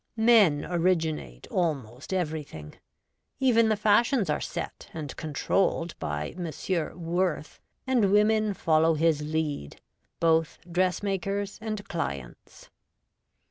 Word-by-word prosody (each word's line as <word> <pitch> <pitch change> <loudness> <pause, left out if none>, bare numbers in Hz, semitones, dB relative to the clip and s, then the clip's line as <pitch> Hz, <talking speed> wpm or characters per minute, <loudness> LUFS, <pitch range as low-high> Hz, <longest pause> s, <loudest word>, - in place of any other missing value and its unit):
Men 220 -10 +5
originate 165 - -1
almost 140 - -2
everything; 150 - -4 0.7
even 230 -4 +4
the 215 - +3
fashions 210 - +3
are - - -1
set - - -6
and 150 -4 -5
controlled 170 +2 0
by 75 0 -3
M. 175 -2 -5 0.5
Worth, 170 -2 -1 0.3
and 240 -7 +2
women 210 0 +3
follow 160 -1 +3
his 155 -1 +2
lead, 150 - -3 0.4
both 165 -1 +2
dressmakers 195 +3 -1
and 215 -2 -4
clients. 70 - -6
170 Hz, 100 wpm, -27 LUFS, 155-205 Hz, 0.7 s, Men